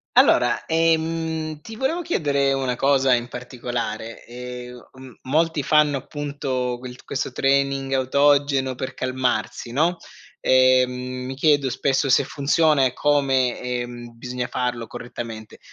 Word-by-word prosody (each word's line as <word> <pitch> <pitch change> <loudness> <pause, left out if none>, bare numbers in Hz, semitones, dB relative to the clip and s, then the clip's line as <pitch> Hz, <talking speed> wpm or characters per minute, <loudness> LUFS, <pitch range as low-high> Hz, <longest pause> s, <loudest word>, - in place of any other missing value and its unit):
Allora, - - +4
ehm, 160 -1 0
ti 220 +5 -9
volevo 290 +7 0
chiedere 140 - +1
una 135 -2 0
cosa 135 0 +3
in 120 0 0
particolare, 120 -3 -5
ehm, 125 0 -9
m 130 0 -12
molti 155 +2 +1
fanno 150 -1 +3
appunto 135 -3 -3
quel 125 0 -9
questo 135 -1 -3
training 135 +1 +1
autogeno 140 0 +2
per 130 - -5
calmarsi, 130 -2 -2
no, 165 +7 +1 0.4
ehm, 130 -1 +4 0.3
mi 130 +1 -5
chiedo 145 -1 +3
spesso 135 +2 0
se 130 - +5
funziona 145 0 +2
e 125 - 0
come, 135 -4 +1
ehm, 120 -1 -5
bisogna 125 0 -4
farlo 120 -2 -2
correttamente. 115 -3 -8
130 Hz, 125 wpm, -23 LUFS, 125-145 Hz, 0.4 s, se